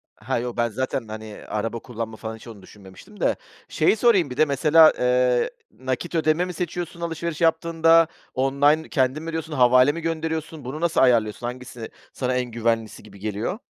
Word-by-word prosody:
Ha, 120 +3 -3
yok, 120 0 -5
ben 120 0 +1
zaten, 130 +1 -3
hani, 110 0 -8
araba 115 +2 -3
kullanma 115 -2 -6
falan 110 0 -6
hiç 110 - -14
onu 105 -4 -11
düşünmemiştim 105 - -15
de. - - +2 0.3
Şeyi - - +2
sorayım, 205 - +3
bir 125 - -7
de 155 - +5
mesela, 155 +3 +5
eee, 125 -1 +2 0.3
nakit 130 +7 -3
ödeme 160 +2 +2
mi 180 - -6
seçiyorsun 175 0 -5
alışveriş 170 0 -4
yaptığında 165 0 +4 0.3
online 140 +4 +2
kendin 135 +3 0
mi 165 - -5
ödüyorsun, 160 -1 -4
havale 125 0 +5
mi 165 +3 -6
gönderiyorsun, 160 -2 -4
bunu 145 +5 -6
nasıl 170 -1 +2
ayarlıyorsun, 120 -2 +2
hangisi, 125 -2 -8 0.2
sana 130 -1 -2
en 125 - 0
güvenlisi 115 -2 -2
gibi 100 -2 -15
geliyor? 110 - -3
130 Hz, 175 wpm, -23 LUFS, 115-160 Hz, 0.3 s, de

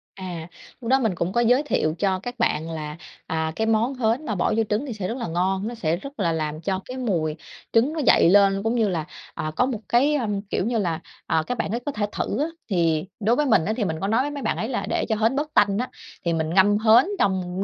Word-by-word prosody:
À. 175 -4 -6 0.3
Lúc 230 - -4
đó 265 +1 +5
mình 220 -7 0
cũng 170 +2 -2
có 240 - +3
giới 245 +4 +4
thiệu 160 - 0
cho 190 -2 +1
các 245 +5 -7
bạn 160 +2 0
là, 155 -1 -5 0.3
à, 160 0 -1
cái 220 - 0
món 225 +4 +2
hến 250 +3 0
mà 215 - -2
bỏ 175 - +1
vô 225 - +3
trứng 215 +7 0
thì 250 - -4
sẽ 195 -4 -4
rất 235 - -3
là 240 - -3
ngon. 190 +4 0
Nó 240 - -5
sẽ 170 -7 0
rất 275 +3 -10
là 170 -4 +2
làm 155 -1 -3
cho 190 0 -2
cái 255 +1 -7
mùi 170 -11 -1 0.4
trứng 240 +7 +3
nó 320 - -3
dậy 245 - +5
lên, 195 0 +4
cũng 225 +2 0
như 225 -4 +2
là, 165 -4 -2 0.3
à, 155 - -3
có 250 - +3
một 250 -4 -3
cái, 275 +5 +3
ờm, 210 -7 -1
kiểu 200 -2 -2
như 235 +1 0
là, 170 -6 -1 0.3
à, 160 - +2
các 250 - -2
bạn - - -2
ấy 235 - -1
có 290 - -1
thể 210 -6 -1
thử 215 - -2
á. 295 - +2 0.2
Thì 165 -3 +1
đối 225 +3 +2
với 300 - +1
mình 195 -10 +3
á, 215 - 0
thì 225 - 0
mình 160 -2 -2
có 195 - 0
nói 225 +4 +2
với 290 - -2
mấy 285 -1 -5
bạn 220 - 0
ấy 225 - -2
là 245 - -2
để - - 0
cho 220 - +2
hến 225 +5 +1
bớt 300 +1 -2
tanh 200 -1 +4
á, 250 +3 -2 0.4
thì 170 - +1
mình 160 -1 -1
ngâm 200 +2 +5
hến 220 +3 +6
trong 185 -1 0
210 Hz, 275 wpm, -24 LUFS, 175-240 Hz, 0.4 s, hến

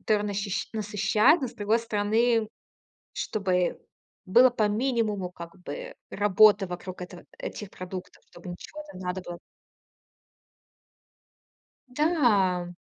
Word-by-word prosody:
который 210 -1 +1
нащищи 200 -1 -2
насыщают, 215 - +3
но 260 - -2
с - - -13
другой 215 +3 +1
стороны, 225 +1 +1 0.7
чтобы 185 -4 -1 0.5
было 245 +7 +6
по 215 -3 +1
минимуму, 215 -5 0
как 170 +1 -10
бы, - - -7 0.2
работы 205 0 +5
вокруг 180 +1 -7
этого 180 0 -9
этих 205 -2 -6
продуктов. 185 0 -8
Чтобы 180 - -11
ничего 300 +11 -9
там 185 - -11
не 185 - -8
надо 180 +1 -2
было 175 0 -7 2.5
Да. 240 - +2
205 Hz, 115 wpm, -27 LUFS, 185-230 Hz, 2.5 s, было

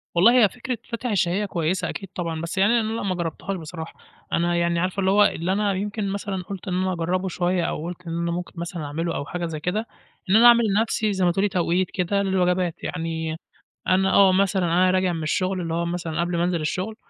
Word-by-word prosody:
والله 235 +7 +6
هي 200 - +5
فكرة 250 0 -5
فاتح 235 +1 -3
الشهية 195 0 +1
كويسة 175 0 -1
أكيد 195 -2 -6
طبعًا، 165 -3 -3
بس 170 +3 -5
يعني 210 +5 +4
أنا 220 -1 -2
لأ 230 - -3
ما 190 -2 -1
جربتهاش 175 +3 -3
بصراحة، 160 0 -8 0.4
أنا 175 +1 +1
يعني 170 0 +1
عارفة 185 +3 -1
اللي 190 0 +2
هو 205 +1 +6
اللي 170 +3 0
أنا 205 0 +1
يمكن 205 +1 -3
مثلًا 195 -2 -3
قلت 195 +1 -8
إن 180 - -2
أنا 185 0 0
أجربه 180 +3 -1
شوية، 180 0 0
أو 155 - -3
قلت 180 0 -7
إن 165 0 -3
أنا 170 0 -1
ممكن 175 0 -5
مثلًا 170 -2 -5
أعمله 165 +4 -3
أو 140 - -3
حاجة 175 +3 -4
زي 160 -2 -4
كده، 210 +8 -2 0.4
إن 195 - +4
أنا 235 +2 +7
أعمل 235 0 +7
لنفسي 215 0 +1
زي 190 -1 +1
ما 175 - +4
تقولي 195 +3 +1
توقيت 180 0 0
كده 195 +2 0
للوجبات، 180 -2 0
يعني 160 -1 -3 0.5
أنا 190 +1 +3
آه 195 -2 +6
مثلًا، 190 -1 +2
أنا 180 +2 +3
راجع 185 -1 +1
من 160 -2 -4
الشغل 185 +4 0
اللي 165 -1 -3
هو 170 +1 0
مثلًا 170 -2 -2
قبل 175 0 -1
ما 170 - +1
أنزل 175 -2 0
الشغل، 190 +7 -2
180 Hz, 230 wpm, -24 LUFS, 170-195 Hz, 0.5 s, أنا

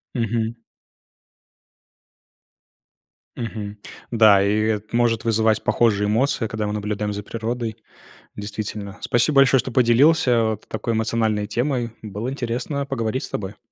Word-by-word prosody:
Мгм. 115 -1 -1 2.8
Мгм. 105 -3 -5 0.3
Да, 110 -4 +6
и 105 +2 +2
это 110 0 -1
может 120 -1 +2
вызывать 110 -1 +2
похожие 105 -3 +2
эмоции, 130 +3 +1
когда 110 -1 -3
мы 105 - -2
наблюдаем 105 0 -2
за 105 0 -5
природой, 115 +1 -4 0.6
действительно. 105 0 -6
Спасибо 120 +5 +1
большое, 135 -1 +6
что 125 +1 -3
поделился, 130 +5 +4
а, 115 -2 +3
вот 110 -1 -6
такой 110 +2 -3
эмоциональной 110 -2 0
темой. 120 +1 -1
Было 105 +2 -5
интересно 135 +2 -3
поговорить 130 -2 -2
с - - -8
тобой. 100 0 -5
110 Hz, 125 wpm, -22 LUFS, 105-120 Hz, 2.8 s, Да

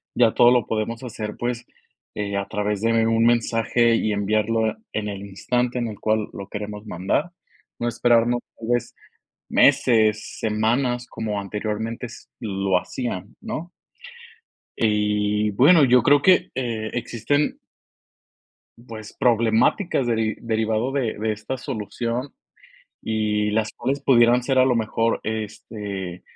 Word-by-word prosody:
Ya 115 -2 +4
todo 120 0 +6
lo 125 -3 +3
podemos 115 +2 -3
hacer, 105 -3 -5
pues, 120 0 -3 0.5
eh, 100 -1 -2
a 100 - -2
través 105 0 -2
de 115 0 +2
un 115 0 +2
mensaje, 115 0 +2
y 110 -2 0
enviarlo 110 +2 +1 0.2
en 105 -1 -2
el 100 0 -6
instante 120 +6 -1
en 120 - -1
el 105 - -9
cual 110 -1 0
lo 100 -1 -8
queremos 105 0 -6
mandar, 105 - -1 0.5
no 120 - -1
esperarnos 120 0 +2 0.2
tal 115 0 -7
vez 120 -1 0 0.5
meses, 110 -3 +3
semanas, 120 +3 0
como 110 -3 -4
anteriormente 110 +4 -4
s - - -13 0.2
lo 95 -3 0
hacían, 115 -1 -5
¿no? 180 -6 -6 1.1
Y 105 -1 +1
bueno, 140 - +6
yo 125 -1 +4
creo 145 0 +5
que, 185 +3 +4
eh, 115 -4 -3
existen 120 +5 -1 1.3
pues, 110 -2 -9
problemáticas 120 - +2
deri 110 -2 0
derivado 110 +2 0
de 130 -5 -1
de 110 +1 -1
esta 110 +5 -5
solución, 120 +1 -4 0.7
y 105 -1 0
las 110 0 0
cuales 140 +1 -2
pudieran 120 -2 +4
ser, 135 0 +1
a 130 - +6
lo 130 -2 +2
mejor, 115 0 0
este, 105 -4 -5
110 Hz, 135 wpm, -23 LUFS, 105-120 Hz, 1.3 s, todo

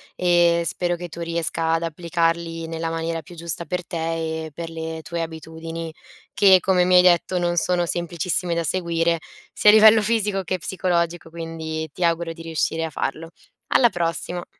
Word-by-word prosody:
e 175 -1 +3
spero 175 +3 -1
che 175 0 -6
tu 170 +1 -9
riesca 165 -1 -1
ad 165 +1 0
applicarli 165 0 -1
nella 165 0 -3
maniera 165 0 -3
più 170 +4 -14
giusta 170 0 -4
per 180 -1 -3
te 160 -1 -3
e 155 - -9
per 165 +2 -6
le 160 0 -6
tue 170 +1 -4
abitudini 160 0 -6 0.4
che, 190 -2 +6
come 180 0 +2
mi 180 0 +3
hai 180 - +9
detto, 180 0 +3
non 175 0 0
sono 175 0 +1
semplicissime 175 +1 -1
da 170 0 -1
seguire, 170 0 0 0.3
sia 210 - +5
a - - +8
livello 220 0 +8
fisico 210 -3 0
che 185 +1 -2
psicologico, 175 -2 -1
quindi 160 -1 -5
ti 180 - -4
auguro 170 0 0
di 165 - -12
riuscire 165 0 -1
a 160 - -2
farlo. 160 +2 -4 0.4
Alla 240 - +4
prossima. 175 -1 -3
170 Hz, 175 wpm, -22 LUFS, 165-175 Hz, 0.4 s, hai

